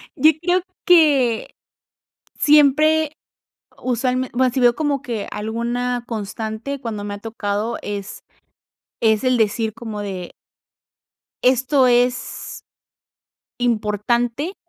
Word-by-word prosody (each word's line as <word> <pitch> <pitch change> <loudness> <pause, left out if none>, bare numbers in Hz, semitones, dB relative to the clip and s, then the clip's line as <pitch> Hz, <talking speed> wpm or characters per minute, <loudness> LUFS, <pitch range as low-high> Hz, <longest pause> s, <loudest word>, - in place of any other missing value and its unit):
Yo 310 +1 +6
creo 355 +1 +2 0.2
que 285 -10 +4 0.8
siempre 305 +1 +4 0.7
usualmen 255 +1 0
bueno, 255 0 +2
sí 260 - -1
veo 240 -1 +5
como 290 -3 -1
que 235 -6 -4
alguna 235 +3 -2
constante 220 +4 -5
cuando 225 -5 -5
me 205 0 -4
ha 205 - -7
tocado 220 +1 -3
es 205 -1 -6 0.8
es 220 0 +3
el 255 -1 +2
decir 220 0 0
como 220 -3 -6
de 190 -4 -6 1.1
Esto 260 +1 +3
es, 245 0 0 1.0
importante 235 - 0
240 Hz, 100 wpm, -20 LUFS, 220-270 Hz, 1.1 s, Yo